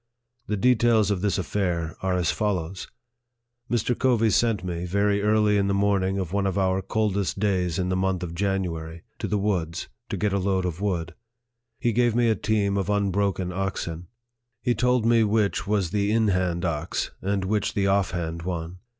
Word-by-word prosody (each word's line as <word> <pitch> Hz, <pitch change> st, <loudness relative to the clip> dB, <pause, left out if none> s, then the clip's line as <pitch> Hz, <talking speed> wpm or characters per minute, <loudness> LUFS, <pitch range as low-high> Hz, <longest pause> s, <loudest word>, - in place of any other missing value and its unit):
The 105 Hz, -, -1 dB
details 115 Hz, -2 st, +3 dB
of 95 Hz, -3 st, -1 dB
this 105 Hz, -1 st, +1 dB
affair 85 Hz, -3 st, -1 dB
are 95 Hz, -1 st, 0 dB
as 85 Hz, -4 st, +1 dB
follows: 95 Hz, -3 st, -2 dB, 0.8 s
Mr. 120 Hz, +1 st, +1 dB
Covey 115 Hz, -4 st, +2 dB
sent 110 Hz, -2 st, +2 dB
me, 90 Hz, -1 st, -3 dB
very 100 Hz, +2 st, +1 dB
early 105 Hz, 0 st, +3 dB
in 100 Hz, -1 st, +2 dB
the 100 Hz, -, +1 dB
morning 100 Hz, -1 st, +1 dB
of 95 Hz, -2 st, -3 dB
one 100 Hz, -1 st, +1 dB
of 95 Hz, -, -1 dB
our 95 Hz, 0 st, +1 dB
coldest 100 Hz, -1 st, -1 dB
days 90 Hz, -5 st, 0 dB
in 90 Hz, -1 st, -1 dB
the 95 Hz, -, 0 dB
month 95 Hz, -1 st, 0 dB
of 85 Hz, -1 st, -5 dB
January, 85 Hz, -4 st, -2 dB, 0.2 s
to -, -, -2 dB
the 105 Hz, -, 0 dB
woods, 90 Hz, -5 st, -2 dB, 0.2 s
to -, -, -2 dB
get 105 Hz, -2 st, 0 dB
a 100 Hz, -, +1 dB
load 95 Hz, -1 st, 0 dB
of 90 Hz, +1 st, -4 dB
wood. 90 Hz, -5 st, -1 dB, 0.7 s
He 120 Hz, -, +1 dB
gave 120 Hz, 0 st, +2 dB
me 120 Hz, -1 st, +3 dB
a 110 Hz, -, +3 dB
team 100 Hz, -1 st, 0 dB
of 100 Hz, 0 st, -1 dB
unbroken 100 Hz, -2 st, 0 dB
oxen. 90 Hz, -3 st, -3 dB, 0.6 s
He 120 Hz, -, +2 dB
told 125 Hz, 0 st, +2 dB
me 115 Hz, -1 st, +4 dB
which 105 Hz, -3 st, +1 dB
was 100 Hz, -5 st, 0 dB
the 100 Hz, 0 st, +1 dB
in 110 Hz, -1 st, +3 dB
hand 90 Hz, -2 st, 0 dB
ox, 80 Hz, 0 st, -2 dB
and 100 Hz, 0 st, -1 dB
which 105 Hz, 0 st, -1 dB
the 100 Hz, -, +1 dB
off 100 Hz, -1 st, +2 dB
hand 85 Hz, -1 st, -4 dB
one. 85 Hz, 0 st, -4 dB
100 Hz, 190 wpm, -25 LUFS, 90-105 Hz, 0.8 s, me